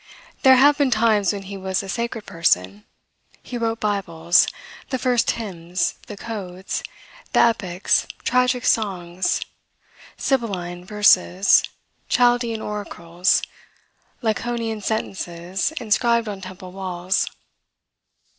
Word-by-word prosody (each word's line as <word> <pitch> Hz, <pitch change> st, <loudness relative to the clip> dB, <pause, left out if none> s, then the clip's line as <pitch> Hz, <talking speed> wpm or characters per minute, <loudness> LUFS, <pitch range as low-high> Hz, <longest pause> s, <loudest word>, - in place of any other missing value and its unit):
There 265 Hz, -2 st, +7 dB
have 285 Hz, +3 st, +5 dB
been 280 Hz, -2 st, +3 dB
times 215 Hz, -4 st, +3 dB
when 200 Hz, -1 st, -5 dB
he 195 Hz, +1 st, -7 dB
was 190 Hz, +1 st, -2 dB
a -, -, -8 dB
sacred 235 Hz, +1 st, -3 dB
person; 105 Hz, -, 0 dB, 0.6 s
he -, -, -7 dB
wrote 230 Hz, -1 st, -1 dB
Bibles; 175 Hz, -5 st, +2 dB, 0.4 s
the 260 Hz, -, -1 dB
first 250 Hz, -2 st, +1 dB
hymns; 180 Hz, -5 st, -2 dB
the 210 Hz, -, -8 dB
codes; 190 Hz, -4 st, -5 dB, 0.5 s
the -, -, +5 dB
epics; 195 Hz, -6 st, +2 dB, 0.2 s
tragic 250 Hz, 0 st, +2 dB
songs; 185 Hz, -4 st, 0 dB, 0.8 s
Sibylline 180 Hz, -9 st, -2 dB
verses; 195 Hz, -2 st, +4 dB, 0.5 s
Chaldean 240 Hz, -2 st, +2 dB
oracles; 180 Hz, -3 st, -1 dB, 0.8 s
Laconian 225 Hz, 0 st, -2 dB
sentences 190 Hz, -, -2 dB
inscribed 235 Hz, 0 st, +2 dB
on 200 Hz, -2 st, -5 dB
temple 185 Hz, -1 st, -9 dB
walls. 185 Hz, +1 st, -1 dB
205 Hz, 105 wpm, -22 LUFS, 180-235 Hz, 0.8 s, There